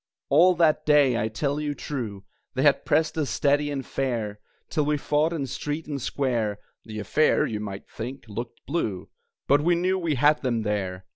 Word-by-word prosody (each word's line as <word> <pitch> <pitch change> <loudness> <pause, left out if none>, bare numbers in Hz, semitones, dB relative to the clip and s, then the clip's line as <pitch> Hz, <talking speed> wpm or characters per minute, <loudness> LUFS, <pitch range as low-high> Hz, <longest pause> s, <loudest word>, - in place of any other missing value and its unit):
All 175 +6 +6
that 160 -2 +3
day, 145 -4 +4
I 110 - 0
tell 140 +6 -2
you 145 -1 -2
true, 110 -11 -5 0.3
They 130 - +1
had 145 -2 +4
pressed 155 +1 +2
us 145 - 0
steady 145 +1 +2
and 140 -2 -3
fair, 115 -6 -2 0.3
Till 155 - 0
we 150 0 +1
fought 150 +3 +1
in 155 -5 -2
street 145 +5 -4
and 145 -3 -4
square 115 -6 -1 0.3
(The 110 -1 -7
affair, 135 +9 +2
you 105 - -3
might 100 -2 -6
think, 125 +4 -7
looked 115 +3 -7
blue), 115 - -2 0.4
But 145 +1 +4
we 175 +3 +3
knew 185 +2 +1
we 165 -4 0
had 150 +4 +4
them 120 -4 0
there! 95 -3 -2
140 Hz, 190 wpm, -25 LUFS, 110-150 Hz, 0.4 s, All